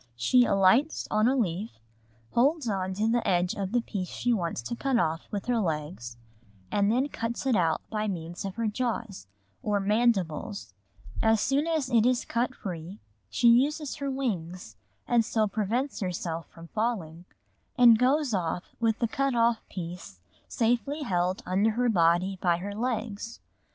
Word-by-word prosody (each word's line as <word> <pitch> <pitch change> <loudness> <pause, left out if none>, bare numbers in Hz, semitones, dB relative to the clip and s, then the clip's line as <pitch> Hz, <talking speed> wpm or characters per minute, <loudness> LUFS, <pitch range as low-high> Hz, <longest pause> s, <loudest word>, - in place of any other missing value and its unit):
_ - - -25
] 115 - -39
She 245 - +4
alights 200 +11 +3
on 215 +1 +3
a 260 - +3
leaf, 205 -2 -1 0.6
holds 280 +3 +2
on 190 -3 -2
to 215 +3 0
the 235 +1 +1
edge 180 0 +2
of 195 -1 -4
the 245 0 +2
piece 195 -5 -4
she 245 +6 -1
wants 170 - -2
to 235 - -4
cut 265 +1 0
off 165 -6 -1
with 205 -2 -4
her 245 -2 +1
legs, 150 - -3 0.5
and 205 +1 +2
then 255 +4 +2
cuts 235 -2 -4
it 260 -3 +3
out 165 -4 +1
by 215 -1 -1
means 175 -3 -5
of 195 -1 -5
her 230 +1 -2
jaws, 220 - -3 0.3
or 205 -1 0
mandibles; 200 - 0 0.5
as 220 -1 +4
soon 280 +8 +1
as 310 -6 -1
it 230 -3 +5
is 250 -1 +1
cut 245 +2 -1
free 180 -2 -7 0.3
she 235 - +2
uses 280 +5 +3
her 280 -1 -3
wings 180 - -4 0.3
and 235 -1 +3
so 220 -1 +1
prevents 225 +7 -2
herself 175 -3 -3
from 165 0 -14
falling, 185 -7 -3 0.5
and 235 -3 +7
goes 265 +1 +2
off 175 -2 -1 0.2
with 225 -1 +1
the 235 - 0
cut 275 +2 0
off 230 -1 +3
piece 175 - -7 0.3
safely 245 +6 0
held 180 -4 -1
under 195 +4 +2
her 245 +2 +1
body 180 0 +2
by 175 -2 +2
her 200 +3 -5
legs. 225 -1 -3
215 Hz, 170 wpm, -28 LUFS, 180-240 Hz, 0.6 s, and